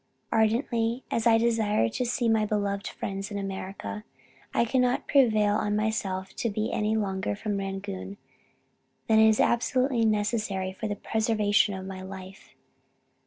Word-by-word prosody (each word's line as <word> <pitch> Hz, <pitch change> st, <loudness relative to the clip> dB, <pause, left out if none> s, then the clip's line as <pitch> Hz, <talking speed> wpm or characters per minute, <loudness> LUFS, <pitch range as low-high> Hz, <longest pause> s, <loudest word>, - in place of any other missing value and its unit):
"Ardently 230 Hz, +2 st, +1 dB
as 230 Hz, 0 st, +1 dB
I 225 Hz, -1 st, +6 dB
desire 225 Hz, -, +2 dB
to 250 Hz, -, -2 dB
see 240 Hz, 0 st, 0 dB
my 220 Hz, -1 st, +3 dB
beloved 205 Hz, -1 st, -1 dB
friends 195 Hz, +1 st, -5 dB
in 205 Hz, -, -4 dB
America, 195 Hz, +1 st, -5 dB, 0.5 s
I -, -, +2 dB
cannot 250 Hz, +1 st, +1 dB
prevail 215 Hz, -7 st, +4 dB
on 210 Hz, -1 st, 0 dB
myself 200 Hz, -3 st, -2 dB
to 230 Hz, -, 0 dB
be 215 Hz, +1 st, -2 dB
any 215 Hz, +1 st, +1 dB
longer 195 Hz, -2 st, -1 dB
from 205 Hz, -1 st, -3 dB
Rangoon 195 Hz, 0 st, -5 dB, 0.9 s
than 220 Hz, -1 st, +4 dB
is 220 Hz, -1 st, +5 dB
absolutely 250 Hz, 0 st, +2 dB
necessary 210 Hz, -3 st, 0 dB
for 215 Hz, +3 st, -4 dB
the 205 Hz, -, -2 dB
preservation 215 Hz, -1 st, +1 dB
of 190 Hz, 0 st, -6 dB
my 190 Hz, -1 st, -7 dB
life. 190 Hz, 0 st, -10 dB
210 Hz, 145 wpm, -27 LUFS, 195-225 Hz, 0.9 s, I